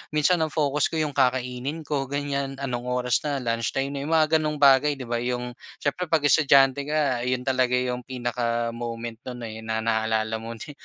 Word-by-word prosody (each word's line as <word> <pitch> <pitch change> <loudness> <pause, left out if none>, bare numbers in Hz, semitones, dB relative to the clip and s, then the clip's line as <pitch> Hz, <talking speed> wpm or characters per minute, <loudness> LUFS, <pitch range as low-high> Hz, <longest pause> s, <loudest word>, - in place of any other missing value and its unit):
minsan 160 +4 +3
ang 160 - +1
focus 150 -2 +1
ko, - - -6
'yong 155 -2 0
kakainin 130 +3 -1
ko 140 -2 -2
ganyan. 140 0 -2
Anong 125 -3 -4
oras 125 -1 +1
na? 145 -1 -2
Lunchtime 115 +4 -1
na, 140 - -4
'yong 145 +3 -4
mga 155 -1 +4
ganong 155 -1 -1
bagay, 145 0 +5
'di 135 - -7
ba? 120 -1 -2
'Yong 125 0 -2 0.3
siyempre 175 +5 -1
'pag 160 -2 +1
estudyante 140 -1 +4
ka, 150 -5 +1
'yon 125 0 0
talaga 130 -1 +1
'yong 125 0 -1
pinaka-moment 120 -2 -3
no'n 125 -1 -6
eh, 110 -1 -6
na 110 0 -3
naalala 110 0 0
mo 115 +1 -7
ne 115 - -8
130 Hz, 190 wpm, -25 LUFS, 120-145 Hz, 0.3 s, bagay